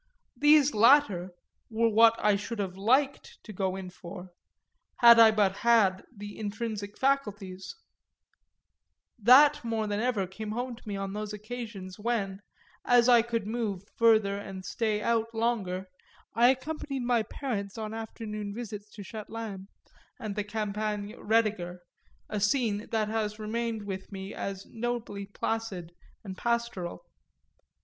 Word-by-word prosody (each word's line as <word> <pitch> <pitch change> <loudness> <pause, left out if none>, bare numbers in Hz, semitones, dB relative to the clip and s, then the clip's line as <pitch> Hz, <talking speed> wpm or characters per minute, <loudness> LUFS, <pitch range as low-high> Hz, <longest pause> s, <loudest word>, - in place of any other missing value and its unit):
These 295 -2 +5
latter 215 -6 +5 0.4
were 230 0 +2
what 225 +1 +6
I 210 -1 +3
should 205 +4 -5
have 190 -3 -3
liked 260 +8 +1
to 215 - -9
go 190 -1 -1
in 190 -1 -7
for, 180 +1 -10 0.7
had 235 -1 +8
I 225 -1 +9
but 205 -3 +2
had 215 -5 +3
the 205 +1 -8
intrinsic 210 -1 -4
faculties; 210 - -1 1.4
that 280 +6 +7
more 225 -2 -1
than 205 0 -2
ever 225 -4 0
came 210 +3 -6
home 245 +1 -3
to 230 - -18
me 205 - -3
on 195 0 -4
those 210 0 -4
occasions 210 -4 -7
when, 205 -4 -2 0.4
as 245 -1 +4
I 240 -2 +7
could 230 -2 -2
move 215 -4 -3
further 215 -3 +4
and 190 -2 -8
stay 215 +1 -1
out 230 0 0
longer, 200 -5 -1 0.5
I 240 +2 +5
accompanied 275 0 -2
my 240 -1 +2
parents 215 -4 -4
on 215 -1 -5
afternoon 215 -2 -6
visits 210 -3 -7
to 205 - -8
Châtelaine 215 -2 -7 0.5
and 210 -2 -5
the 210 - -1
Campagne 210 0 -3
Roediger, 210 -6 0 0.5
a 210 - -3
scene 210 0 +1
that 220 -2 0
has 215 -1 -2
remained 220 0 -3
with 190 0 -6
me 195 0 -7
as 195 0 -5
nobly 230 -4 -4
placid 200 -5 -3 0.3
and 190 -3 -7
pastoral. 235 - -2
215 Hz, 140 wpm, -29 LUFS, 200-235 Hz, 1.4 s, I